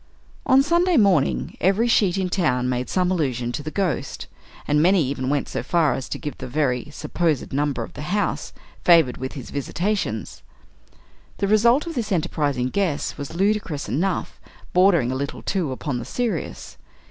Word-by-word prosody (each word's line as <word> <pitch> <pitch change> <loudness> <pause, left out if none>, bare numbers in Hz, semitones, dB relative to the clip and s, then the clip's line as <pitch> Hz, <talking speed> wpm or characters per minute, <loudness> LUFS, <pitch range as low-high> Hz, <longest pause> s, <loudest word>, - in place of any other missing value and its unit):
On 270 0 +6
Sunday 345 +3 +3
morning, 195 - +2
every 195 +7 +3
sheet 200 -5 +3
in 190 -1 0
town 140 -10 +1
made 125 0 -2
some 180 -1 +1
allusion 130 -9 -1
to 135 - -4
the 150 - -5
Ghost, 180 -3 -2 0.4
and 150 +1 +3
many 180 0 +4
even 130 -1 -2
went 145 0 0
so - - -3
far 165 -6 +2
as 130 - -5
to - - -3
give 150 -2 -6
the - - -6
very 130 -1 -1
(supposed) 155 -3 -1
number 140 -3 0
of - - -10
the - - -8
house 200 +7 -1 0.3
favored 165 -8 +5
with 130 +1 -5
his 135 -5 -8
visitations. 155 - -2 1.0
The 200 - 0
result 235 +7 +4
of 335 - -5
this 235 -8 -3
enterprising 145 -7 0
guess 180 -4 -1
was 145 +3 -7
ludicrous 190 -7 0
enough, 180 +5 -2 0.3
bordering 175 -9 +4
a - - -2
little, 140 +1 -4
too, 180 -8 -1
upon 130 0 -3
the 120 - -6
serious. 230 -9 -3
160 Hz, 170 wpm, -23 LUFS, 135-195 Hz, 1.0 s, On